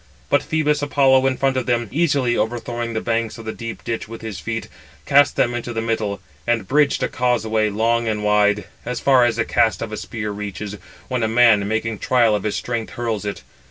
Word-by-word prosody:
But 145 Hz, -, +4 dB
Phœbus 150 Hz, -2 st, 0 dB
Apollo 135 Hz, -2 st, +4 dB
in 130 Hz, -1 st, 0 dB
front 135 Hz, -1 st, +1 dB
of 130 Hz, -, -2 dB
them, 120 Hz, -2 st, +1 dB
easily 140 Hz, -5 st, +1 dB
overthrowing 120 Hz, 0 st, -2 dB
the 110 Hz, -, -1 dB
banks 115 Hz, -1 st, -1 dB
of 115 Hz, -, -10 dB
the 110 Hz, -, -3 dB
deep 115 Hz, -1 st, -7 dB
ditch 115 Hz, -1 st, -3 dB
with 115 Hz, +1 st, -9 dB
his 110 Hz, -5 st, -6 dB
feet, 115 Hz, +4 st, -4 dB, 0.4 s
cast 145 Hz, 0 st, +4 dB
[them] 120 Hz, -, +2 dB
into 120 Hz, 0 st, -4 dB
the 115 Hz, -, -2 dB
middle; 110 Hz, -3 st, -2 dB, 0.3 s
and 115 Hz, -5 st, 0 dB
bridged 145 Hz, 0 st, +2 dB
a -, -, +2 dB
causeway 110 Hz, -4 st, 0 dB
long 115 Hz, +3 st, +1 dB
and 105 Hz, -1 st, -1 dB
wide, 105 Hz, 0 st, +3 dB, 0.2 s
as 125 Hz, -1 st, -3 dB
far 130 Hz, -3 st, +5 dB
as 115 Hz, -2 st, +1 dB
the 115 Hz, 0 st, 0 dB
cast 110 Hz, -, +2 dB
of 110 Hz, -, -5 dB
a 110 Hz, -, -4 dB
spear 105 Hz, -2 st, -5 dB
reaches, 105 Hz, 0 st, -6 dB, 0.3 s
when 125 Hz, -2 st, -2 dB
a 110 Hz, -, +2 dB
man, 110 Hz, -3 st, +4 dB
making 110 Hz, 0 st, -2 dB
trial 120 Hz, -4 st, +3 dB
of 105 Hz, -, 0 dB
his 105 Hz, -, -2 dB
strength, 115 Hz, -2 st, -3 dB
hurls 115 Hz, -4 st, -3 dB
it. 105 Hz, -, -5 dB
115 Hz, 215 wpm, -21 LUFS, 110-125 Hz, 0.4 s, far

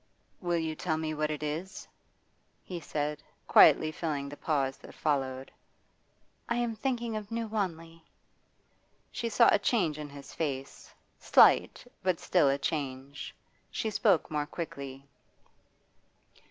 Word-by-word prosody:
'Will 175 Hz, -2 st, 0 dB
you 160 Hz, -1 st, -2 dB
tell 160 Hz, -1 st, -1 dB
me 155 Hz, -1 st, -2 dB
what 155 Hz, 0 st, -1 dB
it 150 Hz, 0 st, -4 dB
is?' 160 Hz, +6 st, -4 dB, 0.8 s
he 180 Hz, -2 st, -6 dB
said, 150 Hz, -1 st, -3 dB, 0.3 s
quietly 155 Hz, -, +7 dB
filling 150 Hz, -4 st, -3 dB
the 145 Hz, -, -8 dB
pause 140 Hz, -4 st, -1 dB
that -, -, -14 dB
followed. 135 Hz, -3 st, -1 dB, 1.0 s
'I 235 Hz, -, +1 dB
am 240 Hz, -2 st, -1 dB
thinking 235 Hz, -1 st, -2 dB
of 210 Hz, -1 st, -5 dB
New 230 Hz, 0 st, -2 dB
Wanley.' 165 Hz, -6 st, -4 dB, 1.1 s
She 235 Hz, -1 st, -3 dB
saw -, -, +5 dB
a -, -, +4 dB
change 185 Hz, -8 st, +1 dB
in 150 Hz, -1 st, -6 dB
his 140 Hz, 0 st, -11 dB
face, 135 Hz, -4 st, -4 dB, 0.3 s
slight, -, -, +5 dB, 0.2 s
but 185 Hz, -3 st, +1 dB
still 170 Hz, -6 st, +3 dB
a 135 Hz, -, +2 dB
change. 140 Hz, -2 st, -4 dB, 0.3 s
She 220 Hz, -, -2 dB
spoke 200 Hz, -7 st, +2 dB
more 150 Hz, -1 st, -1 dB
quickly. 140 Hz, -5 st, -7 dB
155 Hz, 135 wpm, -30 LUFS, 145-190 Hz, 1.1 s, quietly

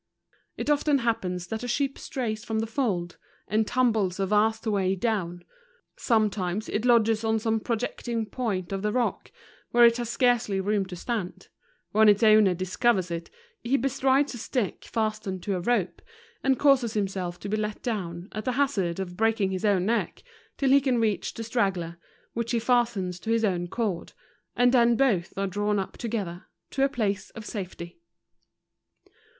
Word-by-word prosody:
It -, -, 0 dB
often 290 Hz, 0 st, +3 dB
happens 185 Hz, -8 st, -1 dB
that 220 Hz, +4 st, -5 dB
a 245 Hz, -, -4 dB
sheep 275 Hz, +2 st, 0 dB
strays 225 Hz, -4 st, -3 dB
from 220 Hz, -, -3 dB
the 220 Hz, -, 0 dB
fold, 210 Hz, -8 st, -2 dB, 0.3 s
and 215 Hz, +2 st, +1 dB
tumbles 220 Hz, -7 st, +1 dB
a 195 Hz, -, +1 dB
vast 220 Hz, +3 st, +2 dB
way 195 Hz, -3 st, +1 dB
down: 180 Hz, -4 st, -2 dB, 0.5 s
sometimes 210 Hz, -3 st, 0 dB
it 215 Hz, +3 st, -1 dB
lodges 225 Hz, -2 st, +4 dB
on 220 Hz, 0 st, +2 dB
some 225 Hz, 0 st, 0 dB
projecting 230 Hz, 0 st, -2 dB
point 205 Hz, -5 st, -3 dB
of 195 Hz, 0 st, -2 dB
the 210 Hz, +1 st, 0 dB
rock, 245 Hz, +1 st, -1 dB, 0.4 s
where 240 Hz, 0 st, +6 dB
it 235 Hz, 0 st, +5 dB
has 240 Hz, -2 st, -3 dB
scarcely 235 Hz, -4 st, +2 dB
room 200 Hz, 0 st, 0 dB
to 185 Hz, -, -7 dB
stand; 205 Hz, 0 st, -4 dB, 0.4 s
when 215 Hz, 0 st, +6 dB
its 205 Hz, +2 st, +4 dB
owner 215 Hz, -4 st, +6 dB
discovers 185 Hz, +1 st, +1 dB
it, 170 Hz, 0 st, -4 dB, 0.3 s
he 255 Hz, +4 st, +1 dB
bestrides 270 Hz, +2 st, +1 dB
a 240 Hz, -, -7 dB
stifck 225 Hz, -4 st, -2 dB
fastened 215 Hz, -4 st, -2 dB
to 200 Hz, -, -1 dB
a -, -, -2 dB
rope, 200 Hz, 0 st, 0 dB, 0.4 s
and 270 Hz, -1 st, +3 dB
causes 260 Hz, -5 st, +3 dB
himself 190 Hz, -4 st, -2 dB
to 200 Hz, -, -6 dB
be 205 Hz, -, 0 dB
let 215 Hz, -1 st, -3 dB
down, 180 Hz, -6 st, -3 dB
at 215 Hz, -, -5 dB
the 255 Hz, -, -1 dB
hazard 205 Hz, -11 st, 0 dB
of 180 Hz, -2 st, -5 dB
breaking 220 Hz, -2 st, +1 dB
his 185 Hz, -1 st, -3 dB
own 195 Hz, -3 st, +3 dB
neck, 230 Hz, +3 st, -1 dB, 0.3 s
till 270 Hz, -2 st, +2 dB
he 280 Hz, +1 st, +6 dB
can 255 Hz, -3 st, +1 dB
reach 215 Hz, -3 st, 0 dB
the 225 Hz, -, -5 dB
straggler, 190 Hz, -7 st, -1 dB, 0.3 s
which 235 Hz, +1 st, -2 dB
he 235 Hz, -, +2 dB
fastens 230 Hz, -7 st, +1 dB
to 220 Hz, -, -7 dB
his 225 Hz, 0 st, +2 dB
own 175 Hz, -3 st, -1 dB
cord; 200 Hz, -3 st, -3 dB, 0.4 s
and 245 Hz, 0 st, +4 dB
then 240 Hz, -2 st, +4 dB
both 220 Hz, -9 st, +1 dB
are 195 Hz, -, 0 dB
drawn 205 Hz, +2 st, 0 dB
up 195 Hz, -, -3 dB
to¬ 235 Hz, -, -5 dB
gether, 190 Hz, -6 st, -4 dB, 0.3 s
to 270 Hz, -, 0 dB
a 275 Hz, -, +3 dB
place 205 Hz, -7 st, -2 dB
of 220 Hz, -, -8 dB
safety. 175 Hz, -5 st, -7 dB
215 Hz, 180 wpm, -26 LUFS, 190-235 Hz, 0.5 s, where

